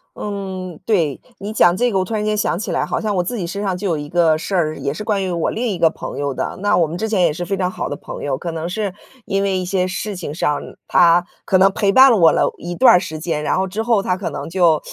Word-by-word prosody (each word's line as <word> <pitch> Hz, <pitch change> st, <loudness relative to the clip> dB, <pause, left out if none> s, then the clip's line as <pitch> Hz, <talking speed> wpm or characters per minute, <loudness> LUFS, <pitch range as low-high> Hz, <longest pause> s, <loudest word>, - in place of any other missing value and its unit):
嗯， 190 Hz, -4 st, -5 dB
对， 165 Hz, -10 st, +1 dB, 0.2 s
你 205 Hz, +2 st, -6 dB
讲 175 Hz, -4 st, +4 dB
这 245 Hz, +2 st, +1 dB
个 195 Hz, -, +1 dB
我 -, -, +1 dB
突 185 Hz, -, -6 dB
然 210 Hz, 0 st, -1 dB
间 215 Hz, 0 st, +1 dB
想 210 Hz, -5 st, 0 dB
起 205 Hz, -, -4 dB
来， -, -, 0 dB
好 -, -, -2 dB
像 215 Hz, -2 st, -1 dB
我 180 Hz, -, +1 dB
自 235 Hz, +7 st, -4 dB
己 180 Hz, -, -3 dB
身 200 Hz, +4 st, -5 dB
上 190 Hz, -3 st, -1 dB
就 195 Hz, +2 st, -3 dB
有 165 Hz, -, 0 dB
一 145 Hz, 0 st, -6 dB
个 165 Hz, -2 st, +3 dB
事 190 Hz, +4 st, -3 dB
儿， 155 Hz, -3 st, +1 dB
也 140 Hz, -, -2 dB
是 210 Hz, -, -6 dB
关 205 Hz, -3 st, 0 dB
于 190 Hz, -, -2 dB
我 170 Hz, -2 st, -1 dB
另 245 Hz, +2 st, -2 dB
一 195 Hz, -, -2 dB
个 165 Hz, -, +4 dB
朋 -, -, -7 dB
友 140 Hz, -1 st, -2 dB
的。 -, -, -4 dB
那， 205 Hz, -2 st, +2 dB
我 170 Hz, -3 st, +3 dB
们 165 Hz, -, -5 dB
之 220 Hz, -, -2 dB
前 210 Hz, -4 st, +1 dB
也 170 Hz, -3 st, +4 dB
是 175 Hz, +3 st, -5 dB
非 195 Hz, +3 st, -1 dB
常 185 Hz, -1 st, -1 dB
好 -, -, -4 dB
的 -, -, -4 dB
朋 -, -, -8 dB
友， 140 Hz, -2 st, -1 dB
可 170 Hz, +3 st, -5 dB
能 165 Hz, 0 st, -4 dB
是 200 Hz, +1 st, -3 dB, 0.3 s
因 195 Hz, 0 st, 0 dB
为 195 Hz, -1 st, 0 dB
一 185 Hz, -, -2 dB
些 185 Hz, 0 st, 0 dB
事 195 Hz, +2 st, -4 dB
情 170 Hz, -5 st, -6 dB
上， 150 Hz, -2 st, 0 dB, 0.3 s
她 175 Hz, 0 st, +4 dB, 0.2 s
可 190 Hz, -, +3 dB
能 195 Hz, +1 st, +5 dB
陪 195 Hz, 0 st, +1 dB
伴 260 Hz, +5 st, +7 dB
了 230 Hz, -, +4 dB
我 165 Hz, -4 st, +6 dB
了 -, -, +1 dB
一 175 Hz, +1 st, -6 dB
段 255 Hz, +2 st, +6 dB
儿 180 Hz, -, +5 dB
时 160 Hz, -4 st, -6 dB
间， 155 Hz, -2 st, -2 dB
然 -, -, +1 dB
后 190 Hz, +1 st, 0 dB
之 210 Hz, +4 st, -3 dB
后 225 Hz, -3 st, +2 dB
她 180 Hz, -2 st, -1 dB
可 190 Hz, -, -4 dB
能 -, -, -6 dB
就 170 Hz, -3 st, +3 dB
185 Hz, 325 characters per minute, -19 LUFS, 170-200 Hz, 0.3 s, 伴